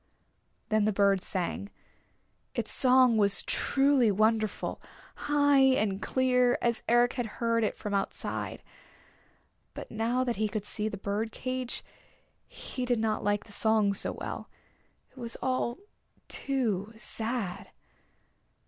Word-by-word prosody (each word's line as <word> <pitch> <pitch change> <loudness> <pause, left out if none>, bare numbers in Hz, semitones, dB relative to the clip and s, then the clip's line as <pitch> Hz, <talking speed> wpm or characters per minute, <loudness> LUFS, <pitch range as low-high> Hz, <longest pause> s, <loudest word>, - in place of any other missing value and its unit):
Then 215 -1 +2
the 215 - +2
bird 200 -1 +3
sang. 185 +2 -3 0.9
Its - - -1
song 255 -3 +5
was 200 -2 +4
truly 270 -4 +2
wonderful, 215 +1 0 0.3
high 285 -1 +2
and 215 -7 +3
clear, 250 -1 +2
as 235 -1 0
Eric 240 +1 +4
had 245 -3 -2
heard 230 -1 +1
it 215 - -1
from 210 - -5
outside. 195 -1 -3 1.1
But - - -8
now 230 +3 0
that 240 -4 -2
he 215 0 0
could 205 0 -4
see 210 +1 -3
the 200 - -6
bird 205 +3 -2
caged 255 0 -4 0.6
he 255 - -6
did 245 -1 +1
not 220 -1 -1
like 205 0 +1
the 215 - -16
song 215 -1 +2
so - - -2
well. - - -6 0.6
It - - -16
was 235 -1 -4
all 255 -1 -1 0.5
too 225 -7 -1
sad. 220 -3 -1
225 Hz, 130 wpm, -29 LUFS, 205-250 Hz, 1.1 s, song